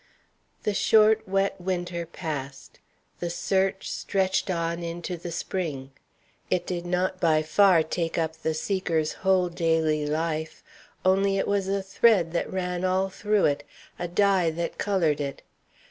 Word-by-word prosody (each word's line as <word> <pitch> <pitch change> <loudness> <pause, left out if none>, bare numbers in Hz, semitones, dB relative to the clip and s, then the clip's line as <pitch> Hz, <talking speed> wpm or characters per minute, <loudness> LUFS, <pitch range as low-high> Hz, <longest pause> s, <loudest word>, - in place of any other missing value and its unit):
The 210 - 0
short, 220 +1 +4
wet 195 -1 0
winter 175 -2 -3
passed. 145 -5 -6 0.4
The 175 - -2
search 190 +2 0
stretched 190 -1 0
on 170 -1 -1
into 170 +1 -4
the 175 0 -7
spring. 155 -6 -4 0.6
It 180 - 0
did 175 -1 -4
not, 185 +1 0
by 155 -3 +3
far, 175 +1 +5
take 165 +1 -2
up 160 -1 -1
the 160 0 -2
seeker's 165 -3 -1
whole 190 -1 +3
daily 160 -3 +1
life. 160 +1 -2 0.4
Only 195 +1 +3
it - - 0
was 200 -1 0
a 195 0 -1
thread 195 -3 +3
that 170 - -1
ran 180 -1 -2
all 185 +1 +1
through 210 +1 +1
it, 145 0 +1 0.4
a 175 - -2
dye 190 -1 +3
that 170 +1 -4
colored 170 -8 +1
it. 140 -1 -5
175 Hz, 145 wpm, -26 LUFS, 160-190 Hz, 0.6 s, far